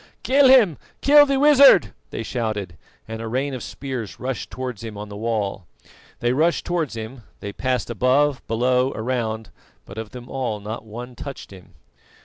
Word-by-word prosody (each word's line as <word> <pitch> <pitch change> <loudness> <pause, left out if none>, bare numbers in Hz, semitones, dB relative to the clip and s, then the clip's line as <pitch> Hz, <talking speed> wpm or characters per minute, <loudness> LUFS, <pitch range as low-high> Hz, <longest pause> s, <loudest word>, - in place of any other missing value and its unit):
"Kill 275 +1 +5
him! 220 - +5 0.2
Kill 290 +1 +7
the 275 -1 +1
wizard!" 280 - +6 0.2
they 115 - -5
shouted, 110 -7 -3 0.3
and 110 0 -6
a 115 - -5
rain 135 +4 -2
of 130 - -5
spears 125 -6 -6
rushed 130 0 -4
towards 125 -4 -6
him 110 -2 -7
on 105 0 -7
the 100 - -8
wall. 105 -4 -2 0.5
They 120 +1 +1
rushed 160 +5 +1
towards 165 -8 -2
him, 115 +3 -7 0.2
they 100 0 -6
passed 125 -1 -2
above, 130 +5 +2
below, 125 +3 +1
around; 110 -2 -3 0.3
but, 100 +3 -9
of 110 -1 -6
them 125 +1 -10
all, 125 -5 -3
not 110 +2 -7
one 120 +3 -8
touched 140 -2 -8
him. 95 -2 -15
120 Hz, 170 wpm, -22 LUFS, 110-135 Hz, 0.5 s, Kill